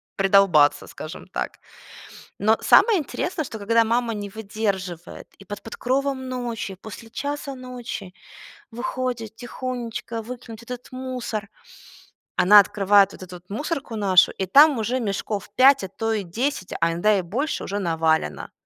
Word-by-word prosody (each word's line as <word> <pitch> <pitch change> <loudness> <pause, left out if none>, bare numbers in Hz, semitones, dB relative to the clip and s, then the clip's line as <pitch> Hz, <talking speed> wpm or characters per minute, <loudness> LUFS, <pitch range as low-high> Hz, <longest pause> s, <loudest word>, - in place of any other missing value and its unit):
придолбаться, 195 -7 +4
скажем - - -9
так. - - -4 0.8
Но 215 +3 +3
самое 445 -5 +6
интересное, 320 +2 -3
что 225 - -7
когда 230 +3 +3
мама 230 0 0
не 205 -1 -5
выдерживает, 195 -5 -4
и 195 - -14
под 205 0 -7
покровом 260 +3 -2
ночи, 240 -6 -4
после 225 +1 -10
1:00 285 +2 -4
ночи, 245 -7 -7 0.6
выходит 240 -2 -4
тихонечко 240 -1 -5
выкинуть 235 -1 -9
этот 250 +1 -8
мусор. 250 -5 -4 0.9
Она 205 +3 +8
открывает 200 0 +4
вот - - -10
эту 180 -1 -10
мусорку 260 - -4
нашу, 195 -4 +5
и 190 - -3
там 285 - +6
уже 230 +4 -1
мешков 205 -2 -3
пять, 270 -2 +6
а - - -5
то 225 +4 -3
и 220 -2 0
десять, 205 +2 -3
а 165 - +3
иногда 205 +5 +2
и - - 0
больше 240 - -3
уже 200 +1 -3
навалено. 160 - 0
225 Hz, 140 wpm, -23 LUFS, 195-250 Hz, 0.9 s, Она